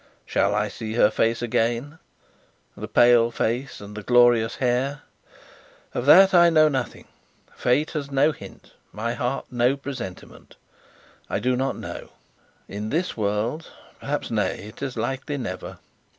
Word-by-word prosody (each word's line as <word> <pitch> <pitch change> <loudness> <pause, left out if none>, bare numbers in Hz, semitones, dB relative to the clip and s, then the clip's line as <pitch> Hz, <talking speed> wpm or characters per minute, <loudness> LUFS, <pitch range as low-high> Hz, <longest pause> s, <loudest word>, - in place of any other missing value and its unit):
Shall - - +1
I - - 0
see 110 -1 -6
her 110 -2 +4
face 115 +2 0
again 120 +6 -1 0.8
the - - -7
pale 120 -1 +5
face 120 +3 -2
and 105 0 -10
the 105 - -6
glorious 120 0 +4
hair? 135 +3 -1 0.9
Of 120 - -3
that 190 +5 +8
I 175 -1 +7
know 155 -2 +5
nothing; 135 -3 -4 0.5
Fate 145 +5 +1
has 145 -3 -4
no 140 +3 +3
hint, - - -13 0.2
my 115 +2 -3
heart 125 +3 -3
no 125 +2 +1
presentiment. 130 -9 -9 0.7
I - - -1
do 125 0 0
not 135 +2 -2
know. - - -8 0.6
In 105 +2 -5
this 175 +7 -1
world, 110 +8 -2 0.3
perhaps - - -4
nay, - - -1
it 110 - -15
is 135 -3 -4
likely 135 +2 -3
never. 100 -8 -6
125 Hz, 145 wpm, -24 LUFS, 115-140 Hz, 0.9 s, that